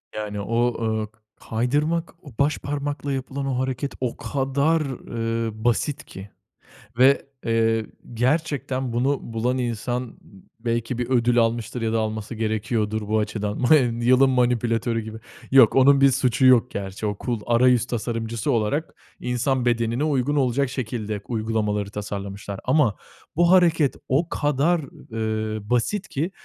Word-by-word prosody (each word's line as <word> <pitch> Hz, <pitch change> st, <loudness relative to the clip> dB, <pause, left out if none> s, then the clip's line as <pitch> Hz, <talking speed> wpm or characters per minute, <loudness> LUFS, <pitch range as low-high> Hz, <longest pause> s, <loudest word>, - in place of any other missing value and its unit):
Yani 105 Hz, -1 st, -4 dB
o, 120 Hz, +3 st, +1 dB
ııı, 110 Hz, -1 st, -1 dB
k 110 Hz, 0 st, -35 dB, 0.3 s
kaydırmak, 150 Hz, +10 st, 0 dB
o 145 Hz, -, -12 dB
başparmakla 145 Hz, 0 st, -1 dB
yapılan 135 Hz, +1 st, -3 dB
o 130 Hz, -2 st, -1 dB
hareket 130 Hz, +1 st, -2 dB
o 125 Hz, -2 st, -2 dB
kadar 140 Hz, +4 st, 0 dB
ııı, 115 Hz, -5 st, -3 dB
basit 125 Hz, +4 st, 0 dB
ki 95 Hz, +2 st, -10 dB, 0.7 s
ve, 135 Hz, +3 st, +5 dB, 0.2 s
eee, 115 Hz, -1 st, +2 dB, 0.3 s
gerçekten 130 Hz, -1 st, -1 dB
bunu 130 Hz, +4 st, +1 dB
bulan 120 Hz, +3 st, 0 dB
insan 120 Hz, +1 st, -2 dB
n -, -, -14 dB, 0.5 s
belki 115 Hz, +1 st, -2 dB
bir 120 Hz, 0 st, -3 dB
ödül 120 Hz, -1 st, +2 dB
almıştır 115 Hz, +1 st, 0 dB
ya 115 Hz, 0 st, -1 dB
da 115 Hz, -, +2 dB
alması 110 Hz, +1 st, -3 dB
gerekiyordur 110 Hz, -1 st, -1 dB
bu 110 Hz, +1 st, +1 dB
açıdan. 105 Hz, -1 st, -2 dB
Ma 130 Hz, +5 st, +6 dB, 0.3 s
Yılın 130 Hz, +2 st, +5 dB
manipülatörü 120 Hz, -2 st, +1 dB
gibi. 110 Hz, 0 st, -8 dB, 0.3 s
Yok, 130 Hz, -5 st, +7 dB
onun 135 Hz, +1 st, +6 dB
bir 135 Hz, 0 st, +6 dB
suçu 130 Hz, 0 st, +1 dB
yok 125 Hz, -1 st, +5 dB
gerçi. 100 Hz, +1 st, -5 dB
O 105 Hz, -1 st, -2 dB
cool 120 Hz, -4 st, -1 dB
arayüz 125 Hz, 0 st, +4 dB
tasarımcısı 115 Hz, -2 st, -2 dB
olarak 120 Hz, +8 st, -1 dB, 0.2 s
insan 125 Hz, +1 st, 0 dB
bedenine 120 Hz, +2 st, +1 dB
uygun 145 Hz, -2 st, +1 dB
olacak 135 Hz, -1 st, +1 dB
şekilde 115 Hz, -5 st, -4 dB
uygulamaları 110 Hz, -3 st, -1 dB
tasarlamışlar. 100 Hz, -1 st, -6 dB
Ama 130 Hz, -5 st, +2 dB, 0.4 s
bu 170 Hz, +2 st, +4 dB
hareket 165 Hz, -6 st, +4 dB
o 150 Hz, +6 st, +1 dB
kadar 150 Hz, +4 st, +1 dB, 0.3 s
eee, 110 Hz, -1 st, -2 dB
basit 155 Hz, -, 0 dB
ki 160 Hz, +7 st, -2 dB
120 Hz, 140 wpm, -23 LUFS, 110-135 Hz, 0.7 s, Yok